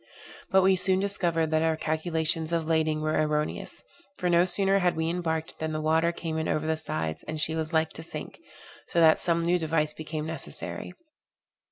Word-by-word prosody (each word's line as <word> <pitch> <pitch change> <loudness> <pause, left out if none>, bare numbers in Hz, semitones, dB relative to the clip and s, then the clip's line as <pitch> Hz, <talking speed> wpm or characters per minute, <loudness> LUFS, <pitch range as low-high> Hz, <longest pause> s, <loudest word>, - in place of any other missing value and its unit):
But 190 -1 +4
we 190 0 +5
soon 185 0 +3
discovered 170 -5 0
that 155 0 +2
our 160 -1 +1
calculations 160 0 -1
of 165 -1 0
lading 155 -1 +1
were 155 0 +1
erroneous; 150 0 -3 0.3
for 180 - -1
no 170 +1 +5
sooner 195 +1 +4
had 180 -2 +1
we 160 0 -1
embarked, 160 -2 -3
than 160 0 -3
the 155 - -2
water 160 +2 +2
came 165 -2 -4
in 160 - -2
over 155 - -1
the 160 0 +1
sides, 80 - -4
and 155 - -3
she 155 +1 +3
was 160 0 -2
like 160 -1 +1
to - - -8
sink; 160 - -8 0.5
so 170 - 0
that 160 -1 +6
some 170 -1 0
new 175 +1 +2
device 155 -1 0
became 155 0 -5
necessary. 160 0 -6
160 Hz, 195 wpm, -27 LUFS, 155-170 Hz, 0.5 s, that